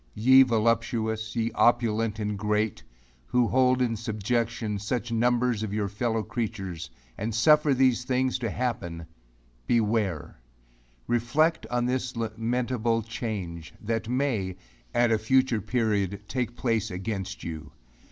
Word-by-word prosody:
Ye 130 +4 +7
voluptuous, 115 -2 +1
ye 115 0 0
opulent 115 -1 +2
and 105 -1 -2
great, 105 +1 -1 0.5
who 125 -1 +2
hold 130 0 +3
in 115 -2 0
subjection 110 0 -2
such 120 +3 -3
numbers 120 0 +2
of 105 -2 -3
your 105 -2 0
fellow 110 +2 -1
creatures, 100 -10 -4 0.3
and 110 +1 -2
suffer 150 +4 +5
these 130 -2 +3
things 130 0 0
to 120 -2 -2
happen 90 -10 -3 0.6
beware! 105 - 0 0.6
Reflect 125 +8 +1
on 120 0 0
this 125 0 -1
lamentable 115 +1 -1
change, 100 -7 -5
that 115 +1 -2
may, 120 -9 -1 0.3
at 120 -1 +3
a 110 - +3
future 125 0 +2
period, 105 -3 0
take 120 +1 -2
place 115 -4 0
against 95 +1 -4
you. 80 -2 -6
115 Hz, 125 wpm, -27 LUFS, 105-125 Hz, 0.6 s, Ye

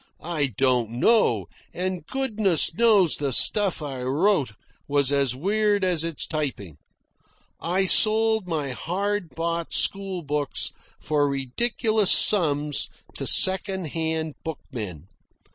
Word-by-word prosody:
I 155 -4 -1
don't 125 -4 +1
know, 220 - +2 0.3
and 185 -1 -4
goodness 215 - 0
knows 205 -5 +3
the 140 -2 -2
stuff 195 - +3
I 135 -3 -6
wrote 145 - 0 0.3
was 140 -1 +1
as 140 -3 +1
weird 205 +6 0
as 175 -4 +1
its 165 -3 -2
typing. 130 - -5 0.8
I 185 +3 -1
sold 220 0 +3
my 150 -5 -3
hard 195 +6 -3
bought 170 0 -3
school 195 -3 -2
books 145 -1 -3 0.3
for 145 -2 0
ridiculous 215 - +1
sums 150 -7 +3 0.2
to - - -4
second 190 -2 +4
hand 160 0 -3
bookmen. 110 - -7
165 Hz, 115 wpm, -23 LUFS, 140-200 Hz, 0.8 s, second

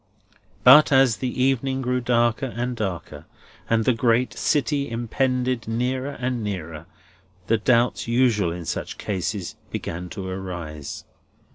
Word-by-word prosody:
But 145 +5 +8
as 130 -4 +5
the 125 0 -2
evening 135 0 0
grew 125 0 0
darker 120 +1 +1
and 125 +1 -3
darker, 95 -8 -5 0.4
and 115 -1 +2
the 130 - +4
great 120 +2 +2
city 145 -2 0
impended 125 +1 -1
nearer 130 +4 -1
and 125 -2 -2
nearer, 85 -5 -5 0.6
the 115 +3 +2
doubts 120 +2 +2
usual 115 -7 +2
in 85 0 -6
such - - -4
cases 95 -2 -3
began 90 +2 -5
to 95 0 -6
arise. 85 -6 -6
120 Hz, 130 wpm, -23 LUFS, 95-130 Hz, 0.6 s, But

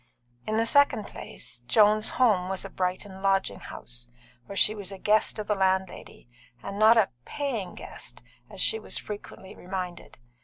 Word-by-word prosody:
In 215 0 0
the 225 - +3
second 285 +4 +4
place, - - -7
Joan's 215 0 +5
home 210 -8 +3
was 190 +1 -3
a 195 - -8
Brighton 190 +1 -3
lodging 195 0 +1
house, - - -7 0.4
where 200 - -7
she 215 - +5
was 200 -3 -6
a 195 - -7
guest 210 +4 +2
of 215 - -3
the 210 - +1
landlady, 190 - -1 0.4
and 200 +1 -5
not 220 +2 +7
a 215 -4 +4
"paying" 235 - -3
guest, - - -8 0.3
as - - -10
she 445 - +2
was - - -2
frequently 205 -2 -8
reminded. 180 -1 -6
195 Hz, 165 wpm, -27 LUFS, 190-215 Hz, 0.4 s, not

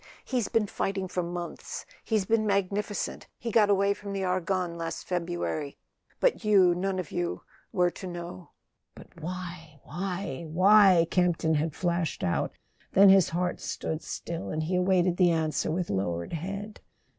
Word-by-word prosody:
He's 245 -4 0
been 225 -2 +2
fighting 195 -1 -2
for 180 0 -2
months; 175 0 -6 0.2
he's 215 -4 0
been 220 +1 +2
magnificent; 200 +1 -1
he 230 - -4
got 210 -2 +4
away 200 0 +3
from 200 0 -7
the 195 -1 -2
Argonne 185 -1 -1
last 165 -1 -5
February; 170 -4 -2 0.4
but - - +2
you 200 -4 +5
were - - +3
none 190 +2 -1
of 180 -5 -4
you 175 -1 -2 0.5
to 190 - -7
know." 175 0 -7 0.5
"But 170 - -14
why—why—why?" 180 +2 +2
Camp 180 -2 +3
ton 160 0 +1
had 155 0 0
flashed 170 -3 -1
out; 85 - 0 0.4
then 195 +1 +8
his 190 -2 +6
heart 175 +1 -1
stood 160 0 -3
still, 170 0 -5
and 155 0 -2
he 175 +4 -1
awaited 180 -1 +2
the 180 -2 +5
answer 160 -3 0
with 170 - -1
lowered 85 - -2
head. 200 +6 -5
180 Hz, 155 wpm, -28 LUFS, 165-195 Hz, 0.5 s, then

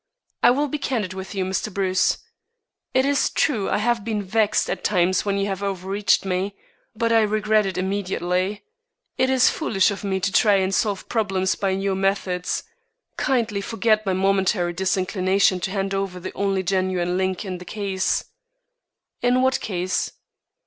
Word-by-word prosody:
"I - - +7
will 285 +4 +2
be 295 +2 -3
candid 225 -9 -2
with 190 +2 -7
you, 190 -1 0
Mr. 190 +3 -2
Bruce. 185 -1 +1 0.7
It 260 +1 +2
is 280 0 +2
true 225 -10 0
I - - +1
have 230 +1 0
been 215 -2 -2
vexed 210 +2 +1
at - - -3
times 185 -1 +2
when 200 -1 0
you 200 - 0
have 195 -1 -3
overreached 195 +1 0
me; 190 +2 -1 0.4
but 230 +1 0
I 225 - +5
regret 215 0 +2
it 190 - -4
immediately. 190 +1 -1 0.6
It 260 +1 +3
is 260 -1 +4
foolish 210 - +1
of 200 - -6
me 190 -1 -1
to 200 +1 -1
try 210 -1 +4
and 190 0 +1
solve 200 0 0
problems 195 -4 0
by 195 - -1
your 195 +1 0
methods. 190 -2 -1 0.5
Kindly 230 -7 0
forget 220 +1 +1
my 195 -2 0
momentary 190 -2 +1
disinclination 185 +1 +1
to 180 - -2
hand 195 0 -2
over 195 -2 -2
the - - -7
only 195 -1 0
genuine 185 -1 0
link 185 +1 -1
in 185 -2 -5
the - - -9
case." 190 -1 -1 1.0
"In 250 +1 +3
what 260 0 +2
case?" 185 -2 -2
195 Hz, 170 wpm, -23 LUFS, 185-215 Hz, 1.0 s, I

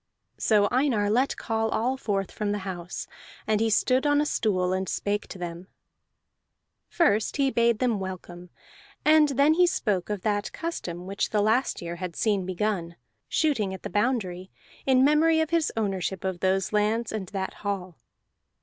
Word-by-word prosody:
So 210 -2 +3
Einar 240 -6 +2
let 255 +5 +1
call 225 0 -1
all 250 +5 0
forth 200 -7 -2
from 210 -1 -2
the 205 - -1
house, 175 -2 -5 0.4
and 215 0 +1
he 225 - +2
stood 255 +6 +2
on 290 0 +3
a 300 - +2
stool, 185 -9 0
and 190 -1 -2
spake 205 0 -2
to - - -9
them. 175 0 -6 1.2
First 220 -11 +2
he 275 -1 +2
bade 235 -2 +3
them 235 -3 +1
welcome, 180 -2 -7 0.6
and 305 -1 +6
then 280 +3 +4
he 355 +2 +4
spoke 205 - -1
of 205 -3 -3
that 205 -1 -1
custom 180 - -5
which 195 +1 -2
the 210 - +1
last 220 -1 +1
year 170 0 -5
had 180 -2 -5
seen 200 -4 0
begun: 185 -3 -2 0.3
shooting 220 -12 +1
at - - -12
the - - -5
boundary 195 -4 -1 0.4
in 260 0 +5
memory 320 +2 +4
of 320 0 0
his 335 -2 +2
ownership 195 -3 -2
of 190 -2 -2
those 190 +2 0
lands 215 +2 +1
and 210 -4 -4
that 190 0 -4
hall. 190 -4 -3
210 Hz, 170 wpm, -26 LUFS, 190-255 Hz, 1.2 s, and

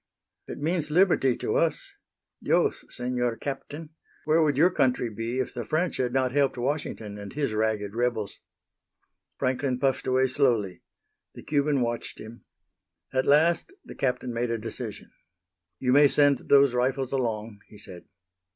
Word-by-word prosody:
"It - - -7
means 155 0 -1
liberty 155 -7 +3
to - - -1
us. - - -1 0.5
Dios, - - +1
Senor 125 -1 -2
Captain, 145 +3 -6 0.3
where 155 +2 +3
would 145 -4 +2
your 175 +5 +5
country 125 -7 +1
be 115 +3 -4
if 130 - -2
the 120 - -4
French 160 - -1
had 125 -1 0
not 130 0 +1
helped 140 -1 +1
Washington 120 -6 -3
and 100 -1 -8
his 140 -5 -2
ragged 105 -2 -1
rebels?" 115 -3 -2 1.0
Franklin 130 0 -1
puffed 135 0 0
away 130 0 +3
slowly. 120 -8 0 0.5
The - - -10
Cuban 145 -2 +1
watched 120 -1 -3
him. 115 +2 -11 0.7
At 130 0 0
last 160 - +3
the - - -9
Captain 125 -2 -2
made 120 +1 -1
a 115 - -1
decision. 115 0 -7 0.7
"You 125 -1 +1
may 145 +1 +7
send 145 -1 +2
those 140 -2 +6
rifles 130 +1 0
along," 115 -5 -2
he 105 - -15
said. 90 -3 -11
130 Hz, 150 wpm, -26 LUFS, 115-145 Hz, 1.0 s, may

